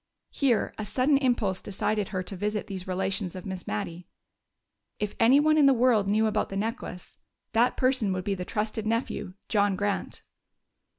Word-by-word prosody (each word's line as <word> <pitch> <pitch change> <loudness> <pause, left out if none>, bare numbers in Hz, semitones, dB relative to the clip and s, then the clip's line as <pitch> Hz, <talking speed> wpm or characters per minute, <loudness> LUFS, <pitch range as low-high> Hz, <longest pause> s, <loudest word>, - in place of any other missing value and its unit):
Here 255 -6 +1
a - - -2
sudden 255 +7 +2
impulse 235 -8 +1
decided 205 +1 -1
her 185 -2 -3
to 195 - -5
visit 210 +2 -2
these 190 -2 -6
relations 190 0 -2
of 185 - -7
Miss 190 -2 -6
Mattie. 165 +12 -4 0.9
If 210 -1 -2
anyone 290 +7 +5
in 285 - +6
the 270 - +5
world 235 -4 +3
knew 215 +2 +3
about 215 -1 0
the 195 - -4
necklace, 215 -4 -5 0.3
that 235 +2 +3
person 255 -6 +2
would 185 -1 -2
be 200 0 -1
the 180 -2 -4
trusted 215 +2 -3
nephew, 220 -4 -2
John 205 -2 +2
Grant. 205 +1 -2
210 Hz, 170 wpm, -27 LUFS, 190-230 Hz, 0.9 s, in